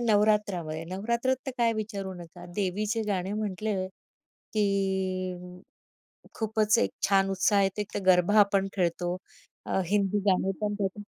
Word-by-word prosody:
नवरात्रामध्ये. 205 Hz, -8 st, +1 dB
नवरात्रात 235 Hz, +6 st, 0 dB
तर -, -, -1 dB
काय 230 Hz, -1 st, +3 dB
विचारू 205 Hz, -3 st, -4 dB
नका. 175 Hz, 0 st, -11 dB
देवीचे 210 Hz, +3 st, 0 dB
गाणे 190 Hz, -1 st, -1 dB
म्हटलं, 205 Hz, -2 st, -2 dB, 0.7 s
की 185 Hz, -3 st, -1 dB, 0.8 s
खूपच 220 Hz, 0 st, +2 dB
एक -, -, +2 dB, 0.2 s
छान 195 Hz, -1 st, +3 dB
उत्साह 195 Hz, +1 st, +3 dB
येते. 195 Hz, +2 st, 0 dB
तर -, -, -1 dB
गरबा 185 Hz, +2 st, +4 dB
आपण 200 Hz, -1 st, +4 dB
खेळतो. 175 Hz, -1 st, 0 dB, 0.5 s
अ, -, -, 0 dB
हिंदी 205 Hz, +1 st, +2 dB
गाणी 190 Hz, 0 st, +3 dB
पण 210 Hz, 0 st, 0 dB
त्याच्यात 200 Hz, +1 st, -2 dB
195 Hz, 130 wpm, -28 LUFS, 185-210 Hz, 0.8 s, गरबा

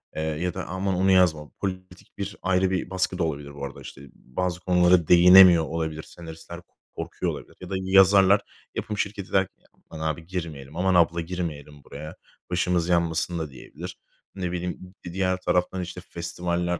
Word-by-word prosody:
eee, 80 Hz, -, -2 dB
ya 80 Hz, +3 st, -2 dB
da: -, -, -5 dB
"Aman 95 Hz, +2 st, -2 dB
onu 95 Hz, +2 st, +3 dB
yazma!" 80 Hz, -5 st, +3 dB
politik 95 Hz, -2 st, -6 dB
bir 100 Hz, +1 st, -5 dB
ayrı 95 Hz, 0 st, +2 dB
bir 90 Hz, -1 st, -2 dB
baskı 95 Hz, 0 st, -1 dB
da 90 Hz, -, 0 dB
olabilir 70 Hz, -2 st, -4 dB
bu 70 Hz, -, -5 dB
arada, 70 Hz, -, -9 dB
işte, 65 Hz, -, -11 dB
bazı 90 Hz, +6 st, -4 dB
konulara 90 Hz, -2 st, +3 dB
değinemiyor 90 Hz, -1 st, +8 dB
olabilir. 80 Hz, -1 st, -3 dB
Senaristler 85 Hz, +1 st, -10 dB, 0.3 s
korkuyor -, -, -3 dB
olabilir -, -, -10 dB
ya 90 Hz, -, -8 dB
da 95 Hz, -, -2 dB
yazarlar 95 Hz, +1 st, +5 dB, 0.3 s
yapım 105 Hz, -, -3 dB
şirketi 100 Hz, -1 st, -3 dB
der 95 Hz, -1 st, +3 dB
ki: -, -, -45 dB
"Ya, -, -, -28 dB, 0.2 s
aman 80 Hz, 0 st, -4 dB
abi 80 Hz, +1 st, -3 dB
girmeyelim, 80 Hz, -6 st, -6 dB
aman 95 Hz, +1 st, +2 dB
abla 85 Hz, -1 st, +3 dB
girmeyelim 75 Hz, -5 st, -6 dB
buraya, 75 Hz, +2 st, -9 dB, 0.4 s
başımız 90 Hz, -1 st, +1 dB
yanmasın." 85 Hz, 0 st, +1 dB
da 80 Hz, -2 st, -4 dB
diyebilir. 85 Hz, +6 st, -10 dB, 0.4 s
Ne 90 Hz, -2 st, -3 dB
bileyim, 90 Hz, +1 st, -5 dB
bir 85 Hz, -, -7 dB
diğer 95 Hz, -1 st, 0 dB
taraftan, 90 Hz, +1 st, 0 dB
işte, 90 Hz, +1 st, -7 dB
festivaller, 85 Hz, +1 st, -2 dB
90 Hz, 175 wpm, -25 LUFS, 80-95 Hz, 0.4 s, değinemiyor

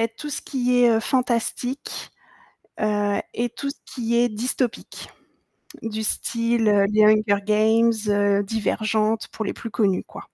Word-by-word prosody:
être 230 Hz, 0 st, -1 dB
tout 300 Hz, -1 st, -6 dB
ce -, -, -3 dB
qui 250 Hz, -2 st, 0 dB
est, 240 Hz, -, +6 dB
heu, 225 Hz, -, +3 dB
fantastique, 250 Hz, +2 st, -2 dB, 0.7 s
heu 205 Hz, -1 st, +1 dB
et 240 Hz, +1 st, -1 dB
tout 280 Hz, +4 st, -5 dB
ce -, -, -9 dB
qui 235 Hz, -2 st, -3 dB
est 240 Hz, 0 st, +4 dB
dystopique, 240 Hz, +2 st, -3 dB, 0.7 s
du 220 Hz, -1 st, -4 dB
style, 230 Hz, +1 st, 0 dB
heu, 205 Hz, -1 st, +4 dB
les 215 Hz, 0 st, +5 dB
Hunger 215 Hz, -1 st, +4 dB
Games, 220 Hz, +2 st, +4 dB, 0.2 s
heu, 205 Hz, 0 st, +2 dB
Divergente, 215 Hz, +1 st, -1 dB
pour 220 Hz, -, -4 dB
les -, -, -3 dB
plus 230 Hz, -, -7 dB
connus, 200 Hz, -4 st, +1 dB
quoi. -, -, -11 dB
225 Hz, 155 wpm, -23 LUFS, 210-240 Hz, 0.7 s, est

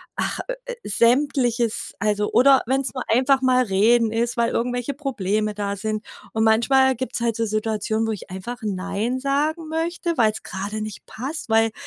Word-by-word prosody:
ach, -, -, -2 dB
ö -, -, 0 dB
äh, -, -, -5 dB
Sämtliches, 240 Hz, 0 st, +1 dB
also 210 Hz, -1 st, 0 dB
oder 270 Hz, +2 st, +6 dB
wenn's 270 Hz, +1 st, 0 dB
nur 255 Hz, -, -3 dB
einfach 265 Hz, +3 st, +3 dB
mal 255 Hz, -1 st, +4 dB
reden 220 Hz, +3 st, +3 dB
ist, 235 Hz, +1 st, -1 dB
weil 235 Hz, 0 st, +2 dB
irgendwelche 245 Hz, +3 st, -1 dB
Probleme 215 Hz, -7 st, -1 dB
da 200 Hz, -1 st, -2 dB
sind. 215 Hz, +1 st, -3 dB, 0.3 s
Und 220 Hz, 0 st, +1 dB
manchmal 260 Hz, +4 st, +4 dB
gibt's 250 Hz, 0 st, -3 dB
halt 230 Hz, -2 st, 0 dB
so 230 Hz, -, 0 dB
Situationen, 220 Hz, +1 st, -1 dB
wo -, -, 0 dB
ich 205 Hz, -, -7 dB
einfach 190 Hz, +7 st, -6 dB
nein 205 Hz, +5 st, -2 dB
sagen 300 Hz, +4 st, -1 dB
möchte, 335 Hz, 0 st, -2 dB
weil's 215 Hz, -2 st, +2 dB
grade 205 Hz, +3 st, -4 dB
nicht 215 Hz, -2 st, -7 dB
passt. 270 Hz, +2 st, -5 dB
Weil 225 Hz, 0 st, +3 dB
230 Hz, 170 wpm, -23 LUFS, 215-265 Hz, 0.3 s, oder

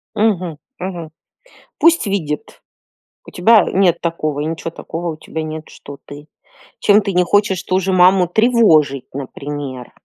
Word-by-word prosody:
Мгм, 185 Hz, -8 st, 0 dB, 0.2 s
мгм. 175 Hz, -4 st, -6 dB, 0.7 s
Пусть 335 Hz, -5 st, +4 dB
видит. 160 Hz, -7 st, -4 dB, 0.6 s
У -, -, -12 dB
тебя 220 Hz, +5 st, +5 dB
нет 180 Hz, -3 st, +2 dB
такого, 155 Hz, -3 st, -2 dB
и -, -, -2 dB
ничё 165 Hz, +1 st, -4 dB
такого 165 Hz, 0 st, -5 dB
у 155 Hz, -, -12 dB
тебя 160 Hz, 0 st, -6 dB
нет, 155 Hz, 0 st, -7 dB
что 140 Hz, 0 st, -12 dB
ты 145 Hz, +1 st, -11 dB, 0.5 s
Чем 205 Hz, +1 st, +4 dB
ты 200 Hz, -1 st, -3 dB
не 180 Hz, 0 st, +3 dB
хочешь 195 Hz, 0 st, +1 dB
ту 185 Hz, 0 st, 0 dB
же 190 Hz, +1 st, -2 dB
маму 185 Hz, 0 st, +5 dB
тревожить, 170 Hz, -, +3 dB
например. 140 Hz, -1 st, -7 dB
175 Hz, 150 wpm, -17 LUFS, 150-195 Hz, 0.7 s, тебя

